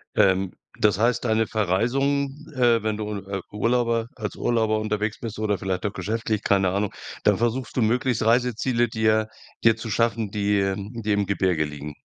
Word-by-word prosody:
Ähm, 95 -1 +3 0.3
das 105 -2 +3
heißt, 120 +2 +2
deine 110 -1 +2
Verreisung, 125 +8 +1 0.3
äh 120 -3 +3
wenn 110 -1 -1
du, 105 -1 -3
äh, 95 0 -5
Urlauber 115 +1 +1
als 105 -4 -5
Urlauber 110 -2 +1
unterwegs 105 0 -2
bist 110 -2 -6
oder 105 -2 0
vielleicht 95 0 -3
auch 100 - -1
geschäftlich, 110 -1 -2
keine 95 -1 +3
Ahnung, 100 +2 -1 0.3
dann - - +4
versuchst 120 0 -1
du 125 - +3
möglichst 120 +1 +1
Reiseziele 120 +1 +2
dir 110 -1 +1 0.4
dir 115 -1 +6
zu 115 0 -7
schaffen, 115 -1 +1
die, 105 -1 +1
ähm 100 +4 -2
die 110 - 0
im 100 0 +1
Gebirge 95 -5 +1
liegen? 75 0 -8
110 Hz, 175 wpm, -24 LUFS, 100-115 Hz, 0.4 s, dir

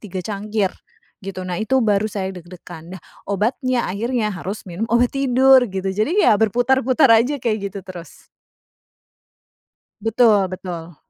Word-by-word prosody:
3 185 -3 -7
cangkir, 205 -1 -2 0.5
gitu. 190 -2 -7
Nah 180 +1 -4
itu, 245 +5 0
baru 210 0 +1
saya 190 -2 -4
deg-degan. 175 -1 -11
Nah, - - -14 0.3
obatnya 240 +5 -1
akhirnya, 215 +3 -2
harus 195 +2 -6
minum 190 +5 -5
obat 235 +2 +2
tidur, 265 -1 +4
gitu. 190 0 -3
Jadi 285 - +1
ya, - - +6
berputar-putar 250 +4 +3
aja 270 +5 -1
kayak 215 -6 -2
gitu 195 -1 -9
terus. 180 -2 -11 1.8
Betul 220 -3 +3
betul. 175 -3 -8
210 Hz, 135 wpm, -20 LUFS, 185-240 Hz, 1.8 s, ya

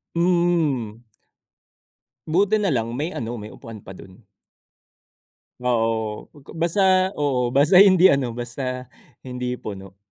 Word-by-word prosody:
Hmm. 165 -10 0 1.3
Buti 195 +6 +2
nalang 125 - -1
may 145 +7 -3
ano, 120 0 -5
may 105 - -8
upuan 115 -2 -11
pa 95 - -11
dun. 95 +4 -15 1.4
Oo, 115 -3 -1 0.3
basta 185 +2 +2
oo. 130 -4 0
Basta 145 +8 +5
hindi 190 -2 +6
ano, 135 -3 -1
basta 125 +1 -5 0.4
hindi 125 -1 -4
puno. 95 -3 -9
125 Hz, 105 wpm, -22 LUFS, 115-170 Hz, 1.4 s, hindi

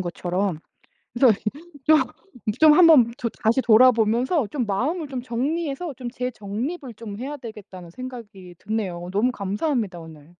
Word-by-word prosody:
것처럼. 180 0 -2 0.5
그래서 240 0 +5 0.5
좀 310 0 +7 0.6
좀 310 -1 +8
한번 310 -8 +7
더 245 - -1
다시 225 +4 +3
돌아보면서 240 +4 +4
좀 255 -2 -1
마음을 285 - -1
좀 260 -2 -4
정리해서 285 +6 -2
좀 250 -1 -6
재정립을 245 - -5
좀 210 -2 -8
해야 275 +5 -5
되겠다는 205 -8 -10
생각이 210 -5 -10
드네요. 185 -6 -4
너무 215 +6 +2
감사합니다 205 - -2
오늘. 155 -3 -13
235 Hz, 310 characters per minute, -23 LUFS, 200-270 Hz, 0.6 s, 좀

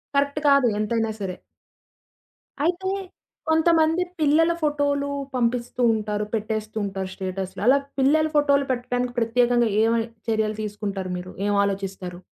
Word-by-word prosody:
Correct 280 +1 +1
కాదు 280 -3 +5
ఎంతైనా 225 +1 0
సరే. 190 -3 -4 1.3
అయితే 360 +3 0 0.6
కొంతమంది 320 +1 +3 0.2
పిల్లల 315 +2 +4
ఫోటో‌లు 285 -1 0 0.3
పంపిస్తూ 245 0 -1
ఉంటారు. 210 -1 -2
పెట్టేస్తూంటారు, 215 -3 -3
స్టేటసులు 190 0 -5
అలా 265 +2 +7 0.2
పిల్లల 310 +4 +4
ఫోటోలు 280 -1 +3
పెట్టడానికి 245 0 -2
ప్రత్యేకంగా 240 0 +2
ఏవి 230 0 +2 0.3
చర్యలు 215 -1 0
తీసుకుంటారు 200 -3 -4
మీరు 180 +1 -7 0.2
ఏం 205 - +1
ఆలోచిస్తారు? 195 -2 -4
235 Hz, 110 wpm, -24 LUFS, 205-285 Hz, 1.3 s, అలా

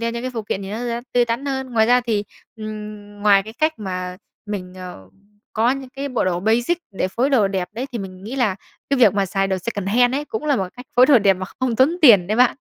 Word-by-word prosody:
đeo 230 0 -1
những 235 +1 -5
cái 255 - -3
phụ 225 - -3
kiện 200 -1 -3
thì 195 - -7
nó 215 - -4
sẽ 235 -1 -3
tươi 245 -1 +4
tắn 240 +4 -3
hơn. 265 -1 -3
Ngoài 220 -1 +3
ra 245 +1 +5
thì, 220 -4 -1 0.3
ừm, 210 -1 -8
ngoài 200 -2 +5
cái 220 +2 -10
cách 310 +6 0
mà 185 -3 -5 0.3
mình, 185 -3 -5
ờ, 180 - -10 0.4
có 230 +3 +2
những 270 -1 -4
cái 275 +2 -5
bộ 250 -6 -1
đồ 175 -1 0
basic 235 - +1
để 190 -2 -2
phối 250 +8 0
đồ 220 -8 +3
đẹp 185 -2 -2
đấy, 245 +5 -4
thì 235 - -3
mình 190 -1 -8
nghĩ 250 +5 -6
là 215 -7 +1 0.3
cái 275 - +2
việc 215 -6 +5
mà 200 -1 +1
xài 195 +1 0
đồ 190 -1 -1
secondhand 230 +5 +1
ấy, 290 +2 -2
cũng 260 +1 -5
là 290 -3 +2
một 190 -2 -2
cách 250 +1 -10
phối 250 +1 +7
đồ 280 -4 +6
đẹp 200 -3 +4
mà 185 0 -6
không 250 -3 0
tốn 285 +8 +3
tiền 210 - +7
đấy 215 +3 -1
bạn. 250 +2 +4
220 Hz, 265 wpm, -21 LUFS, 195-250 Hz, 0.4 s, phối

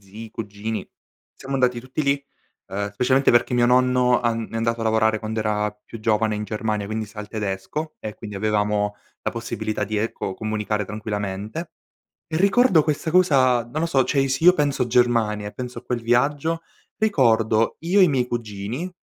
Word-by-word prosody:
zii, 105 +3 -10
cugini. 110 +1 -4 0.5
Siamo 135 +1 -7
andati 125 -2 +2
tutti 130 +5 -4
lì, 140 -1 +1 0.4
uhm, 100 +1 -3
specialmente 130 +5 +3
perché 120 +1 +3
mio 120 0 +4
nonno 125 0 +3
an 115 -2 -1
è 115 - -5
andato 115 0 0
a - - -1
lavorare 110 -1 +2
quando 110 0 -4
era 105 -1 0
più 115 - -10
giovane 110 0 +1
in 105 - -3
Germania, 105 0 -2
quindi, 110 0 -3
sa 105 0 -9
il 105 - -8
tedesco, 105 +9 -4
e 105 -1 -6
quindi, 105 -3 -9
avevamo 105 0 0 0.3
la - - -1
possibilità 110 -1 -3
di, 105 +2 -3
ecco, 105 -3 -2
comunicare 105 -1 -2
tranquillamente. 105 - -4 0.6
E, 160 - -3
ricordo 195 -2 +5
questa 155 +1 -1
cosa, 135 -9 +4
non 155 - -2
lo - - +2
so 135 -6 +2
cioè, 135 +2 +1
se 130 +4 -1
io 180 +1 +8
penso 140 -6 0
Germania, 115 -4 +2
e 105 - -6
penso 125 -1 -6
a 120 - -7
quel 120 -1 -2
viaggio, 145 +8 +1 0.4
ricordo 115 - +2
io 180 +5 +2
e - - +8
i - - +6
miei 130 -4 +1
cugini 120 - -4
115 Hz, 185 wpm, -23 LUFS, 105-135 Hz, 0.6 s, io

